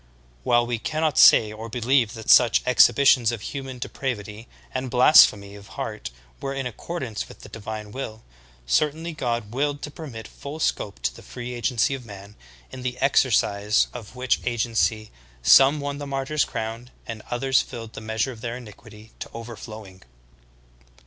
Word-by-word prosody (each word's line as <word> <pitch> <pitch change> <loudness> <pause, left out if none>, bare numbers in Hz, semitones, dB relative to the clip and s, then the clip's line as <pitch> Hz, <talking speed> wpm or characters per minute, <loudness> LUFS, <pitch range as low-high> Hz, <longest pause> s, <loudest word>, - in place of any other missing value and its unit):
While 120 - +3
we 120 -1 -2
cannot 155 +3 0
say 105 -1 +7
or 110 +2 -8
believe 120 0 +1
that 110 -1 0
such 120 -3 +6
exhibitions 125 -2 +5
of 115 -3 -6
hu 140 - -3
man 135 -1 -8
depravity 115 -3 -5 0.3
and 130 0 -3
blasphemy 120 -6 +6
of 100 0 -12
heart - - -5 0.3
were 135 0 -4
in 135 -1 -3
accordance 125 -1 -5
with - - -14
the - - -12
divine 110 -1 -7
will, 110 -3 -7 0.4
certainly 155 - 0
God 120 -7 -3
willed 145 +2 -1
to 145 - -5
permit 135 -8 -9
full 145 +3 -9
scope 100 - -2
to 60 -1 -1
the - - -12
free 125 0 -7
agency 120 +1 0
of 135 -2 -5
man, 100 -2 -12 0.4
in 130 - -8
the 125 0 -4
exercise 105 -6 +2
of 120 -1 -10
which 125 0 0
agency 115 -2 0 0.3
some 135 - +7
won 140 0 -4
the 145 - -6
martyr's 140 +2 -1
crown, 115 +2 -5 0.2
and 115 -2 -7
others 130 +2 +2
filled 115 -1 -9
the - - -8
measure 110 +4 -2
of 115 -3 -12
their 120 0 -4
iniquity 110 -2 -14
to - - -7
overflowing. 110 -4 -9
120 Hz, 165 wpm, -24 LUFS, 110-135 Hz, 0.4 s, say